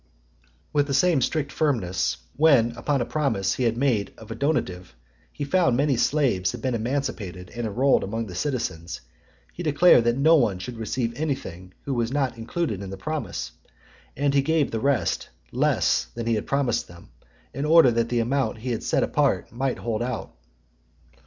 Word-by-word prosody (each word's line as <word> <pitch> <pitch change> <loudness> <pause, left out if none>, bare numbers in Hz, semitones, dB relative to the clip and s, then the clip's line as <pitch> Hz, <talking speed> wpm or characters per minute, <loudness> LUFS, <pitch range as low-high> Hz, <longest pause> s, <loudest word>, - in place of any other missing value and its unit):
With 145 -1 +2
the 140 - 0
same 170 -3 +3
strict 150 +3 -1
firmness, 110 - 0 0.2
when, 135 -7 +4
upon 130 +3 -1
a - - 0
promise 115 -12 0
he 130 - -1
had 115 0 +1
made 120 -7 0
of 110 - -12
a - - -4
donative, 95 - -2 0.4
he - - -5
found 140 -4 +2
many 140 0 +2
slaves 120 -8 +1
had 120 - -7
been 130 -1 0
emancipated 115 -7 -3
and 120 -1 -2
enrolled 130 +6 +2
amongst 110 +2 -3
the - - -7
citizens, 90 - -3 0.5
he - - -7
declared 150 -5 +5
that 120 +1 +2
no 160 +4 +5
one 110 -9 +1
should 115 +5 -7
receive 115 +1 -2
anything 95 - -4
who 140 - -2
was 120 -1 -1
not 135 -3 0
included 115 - -3
in 100 - -6
the 95 - -7
promise, 115 - -4 0.7
and 140 0 +1
he 140 - +4
gave 155 +1 +1
the 115 - -2
rest 140 0 0 0.2
less - - +2
than 115 - -4
he 115 - +1
had 105 - -2
promised 140 -4 0
them, 85 0 -15 0.4
in 140 - -3
order 155 -4 +6
that 115 0 0
the 120 -1 +1
amount 130 +1 0
he 125 +3 -4
had 115 - -2
set - - +1
apart - - 0
might 130 +2 -2
hold 115 -2 -3
out. 125 -1 -4
120 Hz, 185 wpm, -25 LUFS, 110-140 Hz, 0.7 s, order